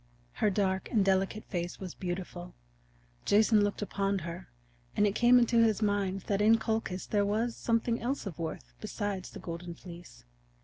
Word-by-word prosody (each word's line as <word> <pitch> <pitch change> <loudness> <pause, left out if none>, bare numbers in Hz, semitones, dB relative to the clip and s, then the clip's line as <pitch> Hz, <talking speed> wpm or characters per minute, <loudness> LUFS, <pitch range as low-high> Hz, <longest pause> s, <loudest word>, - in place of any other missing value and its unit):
Her 215 - +5
dark 190 -1 0
and 210 -4 +2
delicate 195 +2 +1
face 175 -1 -4
was 185 -3 -6
beautiful. 175 - -5 0.7
Jason 215 +1 +4
looked 205 0 -1
upon 200 -1 -1
her, 170 - -7 0.5
and 210 - +5
it 200 - +2
came 240 +3 +6
into 235 -1 +4
his 220 -1 +3
mind 200 -2 0
that 200 +2 -1
in 220 +2 +6
Colchis 220 -4 -2
there 205 -1 +1
was 220 +4 0
something 230 0 0
else 260 +3 -2
of 180 -4 -6
worth 60 - -5
besides 200 -3 -3
the - - -10
Golden 170 0 -6
Fleece. 175 - -12
200 Hz, 170 wpm, -30 LUFS, 185-220 Hz, 0.7 s, came